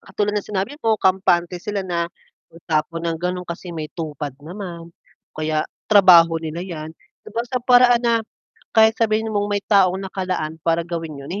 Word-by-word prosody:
katulad 205 +2 -1
ng - - -8
sinabi 200 +6 -2
mo 225 -1 +2
kampante 185 -3 +1
sila 205 0 -3
na 170 -2 -2 0.4
magtapon 165 0 -2
ng 165 - -3
gano'n, 180 +1 -3
kasi 170 0 -7
may 155 -1 -5
TUPAD 150 -4 -6
naman. 170 -3 -8
O - - -36
kaya 155 0 -1 0.2
trabaho 170 -5 +7
nila 160 +2 -5
yan, 160 -4 -7
'di - - -19
ba, 235 - 0
sa 255 +1 -2
paraan 245 0 +5
na, 235 -1 +3 0.6
kahit 220 0 +5
sabihin 220 0 +1
mong 205 0 0
may 205 -1 0
taong 190 -3 +4
nakalaan 185 -5 -3
para 165 0 0
gawin 165 -4 -5
'yun, 140 - -9
eh, 205 - -4
180 Hz, 180 wpm, -21 LUFS, 165-205 Hz, 0.6 s, trabaho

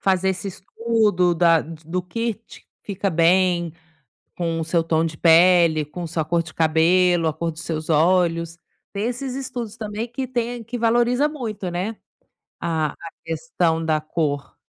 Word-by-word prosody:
Fazer 190 0 +2
esse 190 +2 -4
estudo 200 -2 +1
da 165 -1 +4
do 165 +3 -5
que 230 +5 -2
te 225 +3 -17 0.2
fica 195 -1 -2
bem, 175 0 +2 0.6
com 165 -2 -2
o - - -1
seu 165 0 +1
tom 165 0 +1
de 160 -1 -5
pele, 170 -2 +5
com 170 +4 -7
sua 160 0 -2
cor 170 +2 +1
de 160 - -12
cabelo, 165 +2 +3
a 155 - 0
cor 170 +2 -3
dos 160 +1 -10
seus 155 -1 -4
olhos, 170 +1 +2 0.4
tem 200 +2 -2
esses 250 +1 -4
estudos 245 -5 -5
também 215 +1 -4
que 260 +2 -4
tem 240 -1 -3
que 235 +3 -5
valoriza 240 +4 +2
muito, 220 -10 -5
né, 185 +6 -3 0.6
a 160 -2 0
a 165 - -10
questão 165 -1 -1
da 155 -1 +1
cor,. 150 -2 -3
175 Hz, 165 wpm, -22 LUFS, 165-215 Hz, 0.6 s, pele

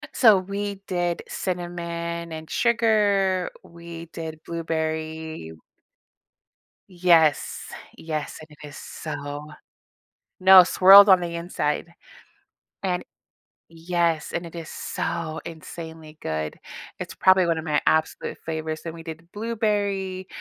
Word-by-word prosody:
So, 220 -6 +7
we 200 +2 -3
did 175 -2 -1
cinnamon, 170 -2 -4
and 160 0 -7
sugar. 205 -5 +2
We 170 0 -10
did 160 -2 -6
blueberry 160 - -4 1.4
Yes, 170 -5 +3 0.3
yes, 155 -2 -4
and 155 - -12
it 150 0 -12
is 145 - -11
so 145 -1 -6 1.0
No, 190 0 +10
swirled 195 +3 +8
on 190 -2 +7
the 170 -1 -4
inside 170 -1 -2 0.9
And 180 -2 -1 0.7
Yes, 165 -1 -1
and 170 - -2
it 165 - -10
is 165 -2 -7
so 160 -2 -4
insanely 160 -1 -9
good. 80 -1 -3 0.4
It's - - -6
probably 185 -1 +5
one 165 -1 +1
of 160 - -4
my 150 -1 +2
absolute 160 0 +1
favorites. 160 -1 -4
Then 165 -1 -5
we 165 - -10
did 165 +1 -10
blueberry, 205 -4 -2
170 Hz, 115 wpm, -24 LUFS, 160-185 Hz, 1.4 s, No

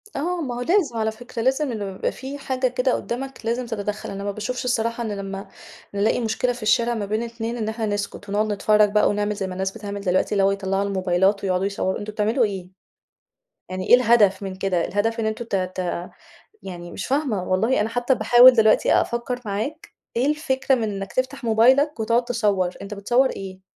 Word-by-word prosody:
آه، 345 +4 -1
ما 250 -5 -3
هو 245 - -4
لازم 325 - +1
على 220 0 0
فكرة، 235 +1 -7
لازم 265 +1 +1
لما 200 -3 -5
يبقى - - -1
في 270 +2 -7
حاجة 260 -2 -1
كده 250 +1 0
قُدامك 265 0 -5
لازم 240 +2 -1
تتدخل، 210 -2 -4
أنا 200 0 -6
ما 200 - -2
باشوفش 220 +5 -4
الصراحة 230 -1 0
إن 220 - -3
لما 195 0 -6 0.5
نلاقي 200 +4 +1
مشكلة 245 +2 0
في 240 - -9
الشارع 235 +2 +2
ما 215 -3 -3
بين 215 +3 -1
اتنين 230 0 -4
إن 220 -2 -2
إحنا 220 0 -3
نسكت 205 -1 -4
ونقعد 210 +1 0
نتفرج 210 0 +3
بقى 210 0 +3
ونعمل 205 0 -1
زي 195 -1 -3
ما 185 - -6
الناس 190 +1 -2
بتعمل 205 -2 -6
دلوقتي، 185 -1 +1
اللي 200 -2 +2
هو 195 - +4
يطلعوا 195 0 -1
الموبايلات 190 0 +1
ويقعدوا 185 0 0
يصوروا، 200 -1 -1
أنتم 215 +1 -6
بتعملوا 220 +4 +2
إيه! 190 -3 -5 1.0
يعني 185 0 -5
إيه - - +8
الهدف 225 -6 +4
من 190 -1 -4
كده! 185 -3 0
الهدف 225 +3 -1
إن 220 - -1
أنتم 220 +2 -3
ت 225 - -5
ت 185 -1 -3 0.5
يعني 175 -2 -8
مش - - -5
فاهمة 265 -8 0
والله، 210 +8 +1
أنا 210 - 0
حتى 245 +3 +1
باحاول 240 +3 +7
دلوقتي 220 -3 +4
أفكر 240 +1 -3
معاك، 220 +11 -4 0.3
إيه 245 +3 +2
الفكرة 280 -3 +1
من 245 - -1
إنك 195 -1 -6
تفتح 260 +1 -2
موبايلك 255 +5 +4
وتقعد 230 +2 +2
تصور، 210 -7 +1
أنت 200 +1 -6
بتصور 245 +6 +2
إيه! 190 -1 -8
220 Hz, 200 wpm, -23 LUFS, 200-245 Hz, 1.0 s, إيه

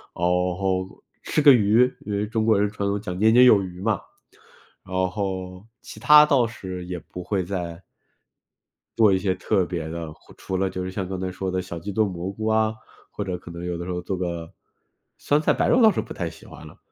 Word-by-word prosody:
后 90 +2 -1 0.2
吃 155 - 0
个 145 -2 +8
鱼， 115 +3 +4
因 105 - -5
为 105 +1 -1
中 110 0 -1
国 110 -3 +4
人 105 - +2
传 100 -1 -3
统 100 +1 -1
讲 90 -3 -5
年 110 +3 +4
年 125 +1 +7
有 105 -5 +6
余 90 -1 -8
嘛， 105 -1 0 0.8
然 95 - -9 0.2
后 95 -1 -5 0.2
其 - - -11
它 150 0 +8
倒 140 -6 +3
是 95 -6 -7
也 90 0 -5
不 90 +2 -9
会 95 0 -1
再 85 -1 -5 1.2
做 110 -3 +5
一 95 - +2
些 95 -1 0
特 95 -2 0
别 85 -3 -4
的， 80 -1 -6
或 - - -20
除 95 - -4
了 95 0 0
就 95 0 -5
是 95 - -5
像 95 -1 -4
刚 95 -1 -5
才 95 0 -3
说 95 +1 -4
的 95 0 -1
小 85 -2 -7
鸡 100 +5 -6
炖 110 +1 +1
蘑 90 +1 -5
菇 110 +2 -5
啊， 110 0 +2 0.4
或 - - -4
者 90 -1 -4
可 90 - -13
能 85 0 -8
有 90 -1 -3
的 85 - -6
时 90 - -4
候 90 - -3
做 95 +1 -4
个 85 -2 -4 0.7
酸 145 +1 +1
菜 - - +2
白 - - 0
肉 250 - +4
倒 220 -2 +7
是 - - -1
不 - - -9
太 - - -3
喜 - - -15
欢 - - -12
了， - - -15
95 Hz, 250 characters per minute, -24 LUFS, 90-110 Hz, 1.2 s, 个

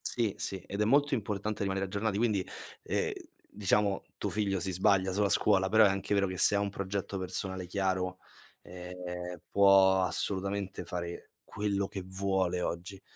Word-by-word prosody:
Sì, 115 -5 0
sì, 95 - -2
ed 100 +1 -4
è - - +3
molto 145 +5 +3
importante 105 -2 -2
rimanere 95 -1 -1
aggiornati. 100 +1 -2
Quindi, 105 -4 +1 0.4
ehm, - - -1 0.4
diciamo, 100 0 +1
tuo - - -2
figlio 100 -2 0
si 95 +2 -1
sbaglia 95 0 +2
sulla 100 +1 +2
scuola, 95 -2 +3
però 110 +2 +6
è - - +5
anche 95 +1 -2
vero 100 -1 +2
che 95 0 -5
se 100 - +7
ha - - +3
un 100 0 -1
progetto 100 0 -4
personale 95 0 -3
chiaro, 95 -1 -1 0.5
ehm, 90 -1 -7
può 95 -1 +5
assolutamente 100 +1 -2
fare 85 -2 -6
quello 100 -1 -2
che 95 - -6
vuole 95 -1 -1
oggi. 90 +3 -4
95 Hz, 165 wpm, -30 LUFS, 95-100 Hz, 0.5 s, se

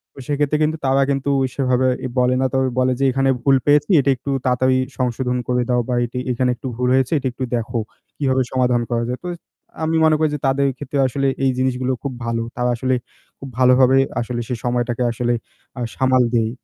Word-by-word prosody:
তো - - -12
সেক্ষেত্রে 145 +1 +1
কিন্তু 155 +1 0
তারা 135 +1 +3
কিন্তু 140 0 -1 0.3
সেভাবে 130 -1 +1 0.2
এ - - 0
বলে 125 0 +3
না 130 - +2
তবে 130 0 +1
বলে 130 0 +2
যে, - - 0
"এখানে 135 +1 +1
ভুল 135 -1 +5
পেয়েছি। 145 +2 +3
এটা 140 - +1
একটু 140 - -8 0.2
তাড়াতাড়ি 130 +1 +2 0.2
সংশোধন 125 0 -1
করে 125 0 +1
দাও 125 -1 +2
বা - - 0
এটি 120 +2 -5
এখানে 125 +1 0
একটু 130 +2 -7
ভুল 125 0 0
হয়েছে। 130 +3 +2
এটা 135 - -2
একটু 130 - -6
দেখো। 115 0 -2 0.4
কিভাবে 130 -2 +1
সমাধান 125 -2 +2
করা 115 -1 0
যায়।" 125 - -3
তো - - -5
ইস 170 - -11 0.4
আমি 160 +1 0
মনে 155 -1 +4
করি 155 -1 +2
যে - - -5
তাদের 140 +1 +2
ক্ষেত্রে 140 0 -4
আসলে 135 +1 -1 0.2
এই 135 - +3
জিনিসগুলো 130 0 0
খুব 140 -2 -3
ভালো। 115 0 -1
তারা 125 0 0
আসলে 130 +2 0 0.4
খুব 135 - -8
ভালোভাবে 130 +1 +5 0.2
আসলে 120 0 -3
সেই 125 - -2
সময়টাকে 120 0 0
আসলে 120 +1 -1 0.5
আ - - -3
সামাল 130 -1 +3
দেই। 115 -1 +2
130 Hz, 210 wpm, -20 LUFS, 125-135 Hz, 0.5 s, ভুল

